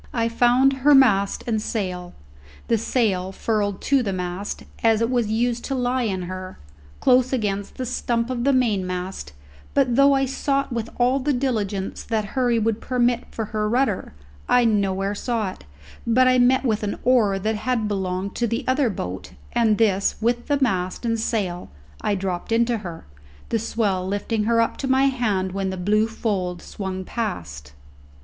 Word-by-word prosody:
I 230 Hz, -1 st, +1 dB
found 250 Hz, +3 st, +3 dB
her 290 Hz, +2 st, +6 dB
mast 200 Hz, -7 st, +4 dB
and 220 Hz, -3 st, 0 dB
sail 180 Hz, -5 st, -4 dB, 0.5 s
the 230 Hz, -, +2 dB
sail 200 Hz, -6 st, 0 dB
furled 205 Hz, -1 st, -1 dB
to 275 Hz, -1 st, +3 dB
the 205 Hz, -5 st, -2 dB
mast, 180 Hz, +2 st, -4 dB, 0.2 s
as 225 Hz, -1 st, +4 dB
it 230 Hz, +2 st, 0 dB
was 240 Hz, -3 st, +1 dB
used 235 Hz, +1 st, 0 dB
to 270 Hz, -, -2 dB
lie 250 Hz, 0 st, 0 dB
in 190 Hz, -4 st, -2 dB
her 185 Hz, +1 st, -7 dB, 0.4 s
close 255 Hz, -1 st, +4 dB
against 205 Hz, -5 st, -2 dB
the 255 Hz, -, -3 dB
stump 240 Hz, -1 st, -1 dB
of 240 Hz, -2 st, -2 dB
the 280 Hz, -, +3 dB
mainmast; 185 Hz, -, -1 dB, 0.4 s
but 255 Hz, -4 st, +3 dB
though 275 Hz, +1 st, +6 dB
I 270 Hz, 0 st, +2 dB
sought 275 Hz, 0 st, -1 dB
with 230 Hz, -1 st, -3 dB
all 250 Hz, +2 st, +3 dB
the 285 Hz, +2 st, 0 dB
diligence 215 Hz, -7 st, -2 dB
that 220 Hz, -2 st, -1 dB
hurry 245 Hz, -3 st, +2 dB
would 225 Hz, 0 st, 0 dB
permit 245 Hz, -1 st, +1 dB
for 225 Hz, -, -4 dB
her 210 Hz, 0 st, 0 dB
rudder, 235 Hz, -, 0 dB, 0.3 s
I 245 Hz, -1 st, +5 dB
nowhere 200 Hz, -2 st, +1 dB
saw 220 Hz, -2 st, -2 dB
it, -, -, -15 dB, 0.4 s
but 255 Hz, +3 st, +4 dB
I 255 Hz, 0 st, +4 dB
met 260 Hz, +2 st, +4 dB
with 220 Hz, -4 st, +1 dB
an 205 Hz, -1 st, -2 dB
oar 225 Hz, -6 st, +3 dB
that 215 Hz, +3 st, -1 dB
had 230 Hz, -1 st, -1 dB
belonged 190 Hz, -1 st, -2 dB
to 240 Hz, -, +1 dB
the 230 Hz, +5 st, -2 dB
other 260 Hz, -1 st, +2 dB
boat, 95 Hz, -, -6 dB, 0.2 s
and 220 Hz, -3 st, +3 dB
this 200 Hz, -3 st, +2 dB
with 240 Hz, +2 st, 0 dB
the 285 Hz, -1 st, +1 dB
mast 185 Hz, -5 st, -1 dB
and 230 Hz, -1 st, 0 dB
sail 195 Hz, -6 st, -2 dB, 0.3 s
I 205 Hz, -, 0 dB
dropped 185 Hz, 0 st, -3 dB
into 230 Hz, 0 st, +2 dB
her, 175 Hz, -5 st, -8 dB, 0.4 s
the 230 Hz, -, +1 dB
swell 205 Hz, -4 st, -1 dB
lifting 210 Hz, +2 st, -1 dB
her 230 Hz, 0 st, +3 dB
up 230 Hz, -, -1 dB
to 270 Hz, -, -3 dB
my 265 Hz, +1 st, +3 dB
hand 220 Hz, -9 st, +1 dB
when 195 Hz, 0 st, -2 dB
the 190 Hz, -, -4 dB
blue 210 Hz, +4 st, +2 dB
fold 195 Hz, -6 st, -2 dB
swung 190 Hz, -2 st, -5 dB
past. 75 Hz, -, -5 dB
225 Hz, 180 wpm, -23 LUFS, 195-245 Hz, 0.5 s, her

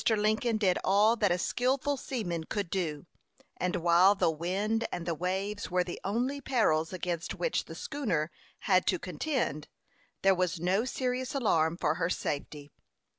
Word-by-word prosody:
Lincoln 220 Hz, +1 st, +2 dB
did 190 Hz, -4 st, +2 dB
all 210 Hz, +4 st, +4 dB
that 205 Hz, -4 st, +2 dB
a 175 Hz, -, +2 dB
skilful 260 Hz, +8 st, 0 dB
seaman 190 Hz, -12 st, -3 dB
could 200 Hz, -2 st, -3 dB
do, 165 Hz, -5 st, -2 dB, 0.5 s
and 180 Hz, 0 st, -1 dB
while 175 Hz, +4 st, +5 dB
the 170 Hz, -, +2 dB
wind 200 Hz, +8 st, -1 dB
and 170 Hz, -, -4 dB
the 170 Hz, -, 0 dB
waves 190 Hz, +3 st, -2 dB
were 180 Hz, 0 st, +2 dB
the 175 Hz, -1 st, -7 dB
only 250 Hz, +8 st, -1 dB
perils 165 Hz, -, +1 dB
against 175 Hz, -2 st, -3 dB
which -, -, -1 dB
the -, -, -9 dB
schooner 180 Hz, -, -2 dB, 0.3 s
had 185 Hz, -3 st, +3 dB
to 185 Hz, -, +3 dB
contend, 180 Hz, -, -2 dB, 0.6 s
there 195 Hz, 0 st, +6 dB
was 180 Hz, -1 st, 0 dB
no 190 Hz, +7 st, +1 dB
serious 255 Hz, +1 st, -2 dB
alarm 170 Hz, -10 st, +2 dB
for 150 Hz, -, +1 dB
her 165 Hz, -, +2 dB
safety. 145 Hz, -3 st, -4 dB
185 Hz, 160 wpm, -30 LUFS, 170-225 Hz, 0.6 s, there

